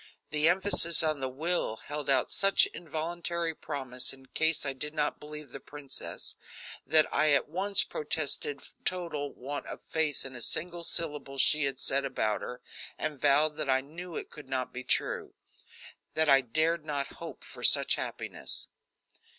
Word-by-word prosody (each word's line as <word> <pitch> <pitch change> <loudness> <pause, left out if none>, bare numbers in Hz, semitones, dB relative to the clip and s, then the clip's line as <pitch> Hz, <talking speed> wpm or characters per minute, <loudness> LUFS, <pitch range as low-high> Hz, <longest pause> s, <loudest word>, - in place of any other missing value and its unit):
The 150 +2 +3
emphasis 175 -2 +6
on 155 -2 0
the 130 -1 -3
"will" 155 -3 -1
held 145 +4 -6
out 135 -2 +2
such 195 0 +5
involuntary 170 +1 -2
promise 135 -5 -1
in 135 -1 -14
case 160 +3 +1
I 135 - -2
did 150 +4 -6
not 150 -1 -1
believe 150 -2 -10
the 140 - -8
princess, 140 -1 -7 0.5
that 155 -1 +7
I 155 0 +3
at 140 - +2
once 190 +5 +4
protested 145 -1 +1 0.2
total 165 -6 -3
want 140 +3 -7
of - - -7
faith 155 -4 -1
in 130 -1 -9
a 120 - -8
single 175 +6 -2
syllable 150 -5 -3
she 150 +3 +3
had 135 -1 -3
said 140 +1 +1
about 110 -6 -2
her, 125 0 -7 0.4
and 150 -3 -5
vowed 150 +1 +3
that 150 - -1
I 130 0 +3
knew 165 +5 -10
it - - -7
could 145 -3 -12
not 130 -1 -3
be 125 - -6
true; - - -1 0.8
that 160 0 +2
I 135 -1 +6
dared 155 +6 -1
not 145 -2 -4
hope - - -9
for - - -12
such - - +4
happiness. - - -2
150 Hz, 165 wpm, -29 LUFS, 135-160 Hz, 0.8 s, that